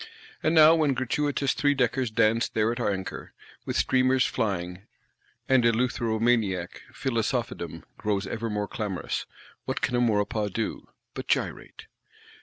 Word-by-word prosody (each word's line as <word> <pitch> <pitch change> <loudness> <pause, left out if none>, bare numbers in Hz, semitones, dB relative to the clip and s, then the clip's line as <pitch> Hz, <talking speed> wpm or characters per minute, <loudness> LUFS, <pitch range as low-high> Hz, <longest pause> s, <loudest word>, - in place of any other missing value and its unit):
And 160 +1 +1
now 155 0 +8
when 155 -5 +2
gratuitous 140 +2 0
three 145 0 +2
deckers 125 -1 +1
dance 115 +1 +2
there 110 +1 +1
at 120 - -4
anchor, 100 -5 -3 0.3
with - - -1
streamers 130 0 +3
flying; 90 -2 -3 0.6
and 130 -2 +4
eleutheromaniac 115 -5 +1 0.2
Philosophedom 115 - -2 0.2
grows 105 -2 -1
ever 115 +3 -3
more 105 -1 -2
clamorous, 105 -5 -4 0.4
what - - -3
can 125 - 0
a 120 - +2
Maurepas 105 -2 +1
do—but 110 +3 -6
gyrate? - - -2
115 Hz, 125 wpm, -27 LUFS, 105-130 Hz, 0.6 s, now